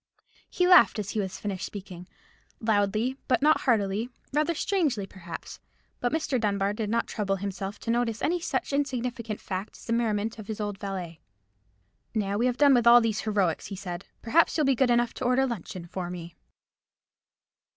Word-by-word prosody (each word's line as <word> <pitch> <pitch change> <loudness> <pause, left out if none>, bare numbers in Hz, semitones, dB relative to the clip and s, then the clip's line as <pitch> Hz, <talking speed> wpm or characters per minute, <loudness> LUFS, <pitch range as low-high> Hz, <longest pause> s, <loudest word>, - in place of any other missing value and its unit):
He 360 - +1
laughed 360 -9 +7
as 205 -1 -3
he 205 -3 -1
finished 190 0 -5
speaking, 185 -3 -8 0.5
loudly 220 +3 +1
but 255 +1 +2
not 310 +1 +5
heartily—rather 245 +8 0
strangely, 300 - 0
perhaps; 175 -3 -9 0.4
but 245 - 0
Mr. 290 -6 0
Dunbar 200 -1 +1
did 210 -1 -3
not 230 +2 +1
trouble 200 -3 -1
himself 195 +1 -4
to 230 - -1
notice 235 -2 0
any 350 +3 +1
such 280 -4 -2
insignificant 250 -5 -2
fact 190 +2 -5
as - - -14
the 230 - -1
merriment 225 -1 0
of 210 - -9
his 220 -1 -5
old 205 -2 -3
valet. 180 -5 -5 1.0
"Now 205 -1 0
we 245 - +3
have 250 -1 -1
done 285 -1 +6
with 240 -2 +3
all 240 +1 +10
these 225 -3 0
heroics," 200 -7 0
he 200 - -6
said, 180 -1 -6 0.2
"perhaps 320 +10 +3
you'll 305 - +3
be 270 - +4
good 255 0 +2
enough 240 -1 +2
to - - -6
order 250 +2 +3
luncheon 185 -7 -5
for 175 0 -5
me." 170 -1 -8
220 Hz, 175 wpm, -27 LUFS, 195-250 Hz, 1.0 s, all